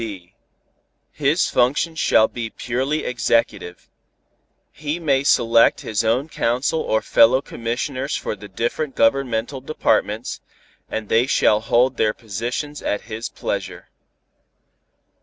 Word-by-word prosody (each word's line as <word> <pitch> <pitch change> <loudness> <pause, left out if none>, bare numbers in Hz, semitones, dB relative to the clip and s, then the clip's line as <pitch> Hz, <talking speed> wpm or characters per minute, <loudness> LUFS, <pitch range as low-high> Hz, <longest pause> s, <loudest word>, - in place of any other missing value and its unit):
(b) 95 -6 -7 0.8
His 150 +4 +1
function 135 +7 +1
shall 110 -8 +3
be 115 -2 -5
purely 130 +7 -2
executive. 115 -6 -1 0.8
He 150 +3 -4
may 140 -5 +1
select 115 -4 +4
his 110 -1 -1
own 120 +6 +1
council 130 +2 0
or 110 -7 0
fellow 120 +3 +5
commissioners 130 +3 -3
for - - -3
the 105 0 -11
different 120 +8 -3
governmental 125 +1 +1
departments, 120 -5 -1 0.5
and 110 -1 -4
they 115 +4 +2
shall 105 -5 +3
hold 120 +3 +2
their 105 -1 +1
positions 120 +7 -5
at 105 - -2
his 115 +1 -6
pleasure. - - -5
120 Hz, 120 wpm, -21 LUFS, 110-135 Hz, 0.8 s, fellow